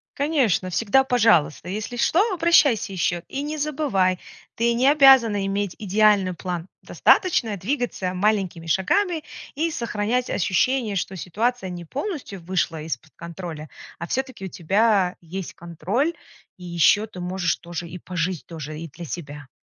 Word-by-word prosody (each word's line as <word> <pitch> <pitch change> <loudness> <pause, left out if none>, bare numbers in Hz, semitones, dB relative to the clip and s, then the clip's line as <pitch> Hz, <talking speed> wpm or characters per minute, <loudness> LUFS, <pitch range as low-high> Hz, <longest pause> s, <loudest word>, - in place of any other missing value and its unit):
Конечно, 270 - +1
всегда 230 +8 +3
пожалуйста! 215 - +2
Если 215 +4 -4
что, 325 +9 +3
обращайся 285 - +3
ещё, 175 -2 -1
и 275 - -3
не 300 +2 -4
забывай: 265 - 0 0.4
ты 235 +1 +2
не 250 +3 +2
обязана 265 -9 +6
иметь 200 -1 -2
идеальный 205 -2 +3
план. 175 0 -5 0.2
Достаточно 240 - +2
двигаться 200 -3 -2
маленькими 185 -3 0
шагами 320 - +1 0.3
и 325 +2 0
сохранять 235 0 -1
ощущение, 215 +4 +1
что 190 - -3
ситуация 210 +4 -2
не 175 -1 -7
полностью 275 - -5
вышла 165 -2 -1
из-под 155 -1 -6
контроля. 170 -3 -8 0.3
А 170 - -5
всё-таки 260 -4 -3
у - - -3
тебя 195 +1 +2
есть 180 +2 -6
контроль, 185 - -2 0.4
и 180 - -11
ещё 175 +5 +3
ты 185 -4 -11
можешь 180 -2 0
тоже 170 -1 -7
и 180 +2 -8
пожить 175 -1 -3
тоже, 155 -2 -7
и 165 - -6
для 170 +4 -9
себя. 145 -3 -7
195 Hz, 145 wpm, -23 LUFS, 175-245 Hz, 0.4 s, обязана